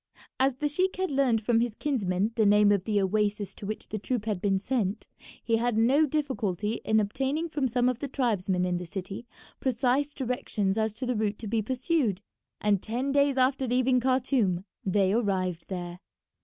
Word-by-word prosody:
As 265 0 +3
the 295 +3 -1
sheik 370 +6 0
had 375 -2 -2
learned 265 -5 +2
from 230 +1 +3
his 235 -2 -1
kinsman 210 -8 0
the 225 - +3
name 205 0 +5
of 200 -2 +1
the 210 -2 +1
oasis 205 0 0
to 200 - -8
which 215 - -5
the 215 - -3
troop 225 +1 -2
had 210 -5 -2
been 195 -2 +2
sent, 210 -1 -2 0.4
he 230 -1 +2
had 235 -1 0
no 270 +7 +4
difficulty 230 - -2
in 220 0 +3
obtaining 270 +10 -1
from 295 -4 -1
some 245 +1 +1
of 255 -1 0
the 285 - -3
tribesmen 200 -9 0
in 180 -1 0
the 180 0 -6
city 195 +5 -6 0.3
precise 260 +3 0
directions 230 -6 -1
as 220 0 0
to 245 +4 -5
the 250 - 0
route 210 -1 -1
to 220 - -7
be 220 +1 0
pursued, 250 - 0 0.4
and 205 -2 +2
ten 250 +5 -2
days 280 -1 +3
after 260 +1 +2
leaving 250 +1 +2
Khartoum 245 -8 +1 0.2
they 195 0 +2
arrived 185 -6 -1
there. 175 -2 -5
225 Hz, 190 wpm, -28 LUFS, 200-260 Hz, 0.4 s, name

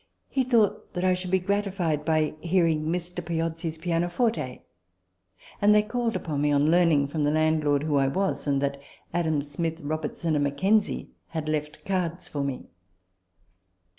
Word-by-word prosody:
He 265 - +1
thought 235 -5 +1
that 180 - -1
I 185 - +4
should 180 0 -3
be 190 - +4
gratified 185 -5 -1
by 155 -1 +2
" - - -25
hearing 165 -4 +3
Mr. 175 +1 -3
Piozzi's 165 0 -2
pianoforte 175 - -1 0.5
": 90 -2 -25
and 210 +1 +6
they 210 - +5
called 230 +1 -1
upon 150 -4 -2
me, 145 0 +2
on 145 +2 +3
learning 165 -5 +4
from 150 +2 -3
the 145 - +3
landlord 155 -2 +2
who 150 -2 +1
I 135 -1 +3
was, 190 +3 -1
and 140 -1 +2
that 140 0 -2 0.3
Adam 160 -4 +1
Smith, 160 +3 -3
Robertson, 155 +1 -2
and 145 -1 +2
Mackenzie 190 +10 +1 0.2
had 160 -2 -4
left 150 0 -3
cards 180 -2 -2
for 145 -2 -3
me. 140 -2 -4
160 Hz, 165 wpm, -26 LUFS, 150-180 Hz, 0.5 s, and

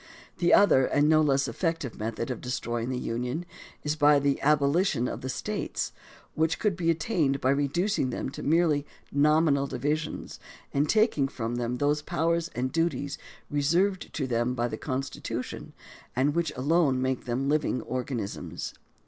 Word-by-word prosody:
The 175 -1 +3
other 135 -10 +6
and 145 +1 +3
no 155 0 +5
less 140 -2 +2
effective 165 +1 -2
method 115 +3 -3
of 125 - -5
destroying 120 -2 -3
the 130 - -2
Union 125 +8 -3 0.4
is 150 +1 0
by 150 -1 +5
the 140 0 +1
abolition 145 -1 +2
of - - -5
the 130 - -4
States, 130 - -3 0.4
which 160 +1 +1
could 210 -4 +1
be 170 -1 0
attained 155 -4 +1
by 130 - +2
reducing 145 +3 +1
them 125 - -3
to - - -7
merely 155 -2 +2 0.3
nominal 145 -1 +3
divisions 150 +5 -3 0.3
and 145 +2 +1
taking 215 - +3
from 120 -3 -4
them 120 0 -1
those 145 +2 +1
powers 165 +2 0
and 130 +1 -1
duties 145 -4 -1 0.3
reserved 170 +7 +1
to 140 - -1
them 120 0 0
by 120 -1 0
the - - -4
Constitution 135 -1 -4 0.4
and 135 +4 +2
which 170 0 0
alone 140 0 +2
make 130 0 -1
them 125 +2 -1
living 145 -4 +1
organisms. 125 -5 -4
140 Hz, 155 wpm, -28 LUFS, 130-160 Hz, 0.4 s, other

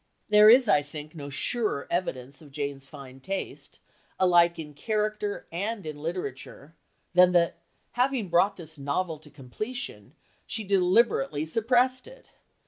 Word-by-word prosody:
There 210 0 +8
is, 245 +1 +7
I 150 -8 +4
think, 150 +1 -9
no 145 -4 -8
surer 150 - -2
evidence 140 -6 -3
of 150 - -14
Jane's 140 -1 -5
fine 135 -3 -12
taste, 195 +7 -6 0.4
alike 175 -2 +4
in 150 -2 -8
character 210 +4 -2
and 200 +4 -3
in 150 -1 -7
literature, 155 -3 -6 0.4
than 180 0 +6
that, 170 -1 +2 0.3
having 250 -3 0
brought 185 +4 +2
this 160 -3 -10
novel 155 +3 -2
to 150 - -17
completion, 185 - -7 0.3
she 225 - -4
deliberately 180 - +2
suppressed 245 - +1
it. - - -15
175 Hz, 135 wpm, -27 LUFS, 145-215 Hz, 0.4 s, There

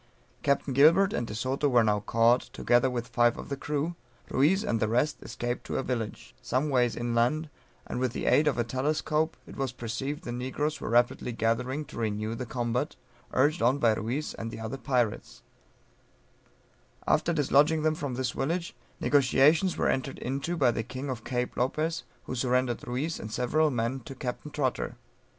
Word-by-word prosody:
Captain 140 -1 +1
Gilbert 170 +9 +6
and 120 - -1
De 105 - -6
Soto 130 +5 0
were 120 -3 +5
now 105 -1 +2
caught, 115 +4 +3
together 120 +2 +3
with 120 -2 -3
five 120 0 +3
of - - -8
the 140 - -1
crew; 150 +4 -2 0.4
Ruiz 165 +9 +3
and 115 - 0
the 110 - +1
rest 125 +7 +1
escaped 120 0 -4
to - - -2
a 135 - -1
village, 115 - -4
some 135 +5 0
ways 125 -3 +2
inland, 120 +6 0 0.3
and - - -4
with 130 -2 0
the - - -4
aid 150 - +4
of 145 - +2
a 120 - +2
telescope 150 +5 0
it - - -11
was 135 -2 -2
perceived 130 +5 -4
the 120 - -5
negroes 130 +5 -2
were - - -3
rapidly 120 +1 +2
gathering 125 +6 -1
to 130 - -9
renew 110 0 -1
the 125 +1 -5
combat, 120 +4 -2 0.4
urged 150 +6 +2
on 125 +4 +4
by 115 -5 +4
Ruiz 120 +8 -3
and 115 - -5
the 115 - -8
other 110 +4 -4
pirates; 120 -3 -1 1.6
after 155 +2 +2
dislodging 150 0 +3
them 155 0 +3
from 145 -5 -4
this 130 -1 -1
village, 170 +5 -2 0.2
negociations 145 +6 +4
were - - +1
entered 135 0 -1
into 140 +7 -3
by 130 -6 +4
the 115 - -2
king 130 +4 -5
of 115 -4 -6
Cape 125 -1 -2
Lopez, 155 +6 -1 0.2
who - - -6
surrendered 125 -1 0
Ruiz 135 +7 -2
and 110 - -7
several 150 +7 +2
men 120 0 -1
to 135 +2 -10
Captain 130 +3 -5
Trotter. 135 -5 -2
130 Hz, 180 wpm, -28 LUFS, 120-150 Hz, 1.6 s, Gilbert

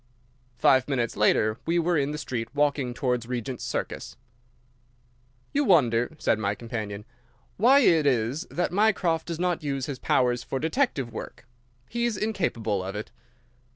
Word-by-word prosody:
Five 130 +2 +4
minutes 125 -5 -1
later 110 +1 +2
we 170 +1 +2
were 170 +1 +2
in 140 -2 +1
the 150 - -4
street, 120 -6 -4
walking 145 -3 +1
towards 125 -3 -1
Regent's 125 0 -4
Circus. - - -4 1.4
"You 290 - +2
wonder," 125 - +3
said 110 - +1
my 100 -1 -1
companion, 105 -3 -5 0.5
"why 260 +7 +6
it 160 - +4
is 130 - 0
that 175 - -1
Mycroft 185 -6 +2
does 170 -1 -4
not 180 -1 0
use 135 -3 -2
his 140 -3 -5
powers 125 -1 +2
for 135 - -4
detective 160 - 0
work. 115 - -8 0.4
He 235 +1 -1
is 235 -4 -1
incapable 120 - -1
of 95 +2 -5
it." 105 - -6
135 Hz, 155 wpm, -26 LUFS, 115-170 Hz, 1.4 s, why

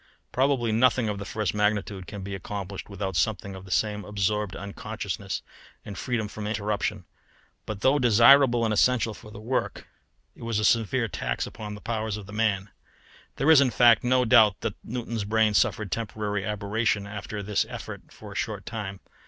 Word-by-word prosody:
Probably 130 -3 +1
nothing 115 0 +3
of 100 -1 -3
the 100 - -6
first 105 -4 -2
magnitude 105 -3 -1
can 100 +2 -7
be 100 +1 -5
accomplished 95 +1 -6
without 95 -2 -4
something 100 +3 0
of 95 0 -10
the - - -13
same 105 +1 0
absorbed 105 0 -1
unconsciousness 100 +1 -5 0.4
and 100 - -7
freedom 115 -2 -2
from 105 0 -6
interruption. 105 -2 -2 0.6
But 105 -2 -5
though 140 +2 +4
desirable 120 +1 +6
and 110 - +1
essential 115 0 +2
for 105 +1 -13
the 105 +1 -10
work, 120 +4 -2 0.5
it - - -16
was 115 -2 -2
a 105 - +1
severe 115 +2 +2
tax - - -2
upon 105 -2 -7
the 105 - -11
powers 110 -2 -2
of 105 - -8
the 105 - -11
man. 105 -3 0 0.7
There 150 +4 +3
is, 150 -3 +8
in 135 - +3
fact, 120 -2 +5
no 125 0 +3
doubt 110 -5 +5
that - - -2
Newton's 115 -2 -4
brain 110 +1 +2
suffered 105 0 +1
temporary 105 -2 -2
aberration 105 0 -1
after 105 0 -6
this 105 0 +1
effort - - -8
for - - -11
a - - -10
short - - -3
time. 100 -4 -6
105 Hz, 180 wpm, -26 LUFS, 100-115 Hz, 0.7 s, is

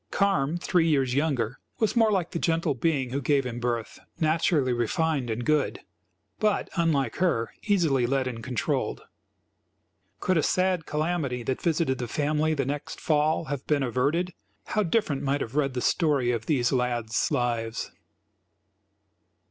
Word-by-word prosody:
Carm, 175 -6 +1
three 175 -1 +2
years 135 -5 +2
younger, 135 -5 0 0.2
was 220 +1 +1
more 225 -2 +4
like 185 -4 0
the 170 - -2
gentle 165 -2 +1
being 135 -1 0
who 140 +2 -1
gave 140 0 +2
him 120 -1 -4
birth; 120 -2 -3 0.2
naturally 155 -4 +2
refined 130 +3 0
and 115 +2 -3
good, 155 -2 +1 0.6
but, 215 -1 +1
unlike 150 -8 +1
her, 135 -11 +1
easily 160 - +3
led 135 +1 +1
and 115 -3 -5
controlled. 125 -4 -2 1.2
Could 185 -2 +1
a - - +4
sad 185 0 +1
calamity 150 -5 -1
that 130 +3 -2
visited 160 -5 +1
the 120 - -3
family 150 +5 0
the 135 -3 0
next 145 +2 -4
fall 155 +1 +1
have 140 -1 -5
been 145 -2 +2
averted, 145 +9 0 0.3
how 215 - 0
different 170 -7 0
might 140 +1 0
have 120 +4 -5
read 140 -3 +1
the 125 - -1
story 140 -7 +2
of 115 -2 -3
these 125 -5 +2
lads' 120 -3 0
lives. 120 -5 -1
145 Hz, 155 wpm, -27 LUFS, 125-165 Hz, 1.2 s, more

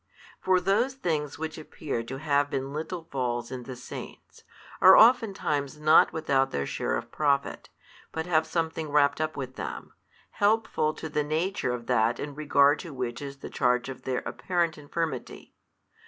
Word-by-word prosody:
For 185 -1 +3
those 210 +9 +1
things 155 - -2
which 160 0 -5
appear 150 -5 -4
to 130 +3 -6
have 145 0 +1
been 135 0 -3
little 160 +3 -4
falls 120 -3 -2
in 130 -1 -5
the 125 +1 -8
Saints, 125 - -10 0.4
are 190 +1 +9
oftentimes 190 - +3
not 155 +1 +6
without 135 -4 +1
their 70 - -2
share - - -2
of - - -7
profit, 140 -2 0 0.4
but 160 0 -3
have 160 -2 +2
something 160 -1 -2
wrapt 145 0 +3
up 155 0 -2
with 130 -2 -6
them, - - -6 0.4
helpful 205 -7 +1
to - - -6
the 150 -1 -1
nature 155 -1 -1
of 120 -1 -4
that 115 +2 +2
in 145 0 -5
regard 145 0 +3
to 165 -6 -8
which 125 -1 -4
is 140 -1 -8
the - - -7
charge 125 0 +1
of 135 - -8
their 130 -1 -2
apparent 175 -3 -1
infirmity. 150 -2 -5
150 Hz, 170 wpm, -27 LUFS, 135-160 Hz, 0.4 s, are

